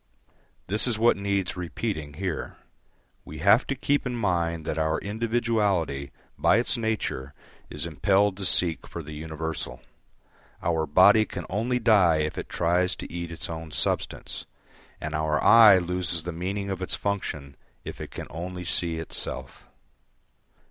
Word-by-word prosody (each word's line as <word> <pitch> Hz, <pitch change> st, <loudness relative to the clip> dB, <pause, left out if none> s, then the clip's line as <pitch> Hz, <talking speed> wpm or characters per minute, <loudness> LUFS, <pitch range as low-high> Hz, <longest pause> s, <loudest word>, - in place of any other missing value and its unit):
This 105 Hz, +6 st, +3 dB
is 115 Hz, -3 st, 0 dB
what 115 Hz, +2 st, +4 dB
needs 100 Hz, -2 st, -1 dB
repeating 85 Hz, -3 st, -4 dB
here. 90 Hz, -1 st, -4 dB, 0.7 s
We 75 Hz, -, -9 dB
have 100 Hz, -, +4 dB
to 140 Hz, -, -1 dB
keep 145 Hz, +2 st, 0 dB
in 125 Hz, -, -3 dB
mind 85 Hz, -7 st, -1 dB
that 80 Hz, -, -2 dB
our 80 Hz, 0 st, +1 dB
individuality 105 Hz, -10 st, -1 dB, 0.3 s
by -, -, +4 dB
its 120 Hz, +2 st, +2 dB
nature 110 Hz, -, -3 dB, 0.3 s
is 75 Hz, +1 st, -4 dB
impelled 95 Hz, +5 st, +2 dB
to 100 Hz, -, -3 dB
seek 85 Hz, -3 st, +1 dB
for 85 Hz, -, -7 dB
the 75 Hz, +1 st, -9 dB
universal. 80 Hz, +1 st, -5 dB, 0.8 s
Our 80 Hz, -2 st, 0 dB
body 100 Hz, +8 st, +6 dB
can 90 Hz, -5 st, -7 dB
only 115 Hz, +6 st, 0 dB
die 100 Hz, -9 st, +4 dB
if 75 Hz, 0 st, -2 dB
it -, -, -6 dB
tries 90 Hz, +2 st, +1 dB
to -, -, -9 dB
eat 85 Hz, -1 st, -5 dB
its 85 Hz, -, -5 dB
own 80 Hz, -1 st, -6 dB
substance, -, -, -1 dB, 0.5 s
and 75 Hz, 0 st, -5 dB
our 75 Hz, 0 st, 0 dB
eye 110 Hz, -3 st, +8 dB
loses 90 Hz, -2 st, -1 dB
the 90 Hz, -, -4 dB
meaning 100 Hz, +4 st, -3 dB
of 95 Hz, -1 st, -4 dB
its 95 Hz, -, -2 dB
function 75 Hz, -9 st, -3 dB, 0.3 s
if -, -, -8 dB
it -, -, -6 dB
can -, -, -7 dB
only 90 Hz, +3 st, -6 dB
see 85 Hz, 0 st, +1 dB
itself. 65 Hz, -5 st, -5 dB
90 Hz, 155 wpm, -26 LUFS, 80-105 Hz, 0.8 s, eye